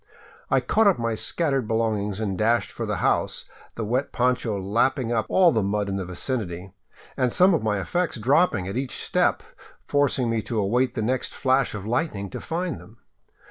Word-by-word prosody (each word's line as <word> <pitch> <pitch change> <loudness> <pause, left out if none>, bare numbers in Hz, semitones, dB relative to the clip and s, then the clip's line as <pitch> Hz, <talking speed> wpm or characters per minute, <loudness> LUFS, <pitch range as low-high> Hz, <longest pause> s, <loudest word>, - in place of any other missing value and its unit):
I - - +3
caught 220 -1 +3
up 195 - +4
my 115 -1 -1
scattered 135 +1 0
belongings 110 -3 -1
and 100 -3 -2
dashed 115 +4 +1
for - - -5
the - - -1
house, - - 0 0.3
the 115 - -3
wet 125 +6 -1
poncho 120 -4 0
lap 105 +7 +1
ping 125 -5 -3
up 110 -2 0
all 180 -3 +5
the 110 - +1
mud 100 +1 -1
in 95 - -2
the 95 - -3
vicinity, 90 -1 -4 0.4
and 125 -2 +1
some 185 +5 +5
of 165 - +1
my 105 -2 0
effects 175 - -1
dropping 120 - +2
at 95 - -4
each 130 0 -3
step, - - +1 0.4
forcing 140 -3 +1
me 115 -1 0
to 115 - -4
await 120 +5 +1
the 110 - -1
next 125 +3 -1
flash 130 -3 +1
of 100 -1 -6
lightning 110 - -2
to - - -6
find 175 +1 -3
them. 110 +3 -16
115 Hz, 195 wpm, -24 LUFS, 105-130 Hz, 0.4 s, all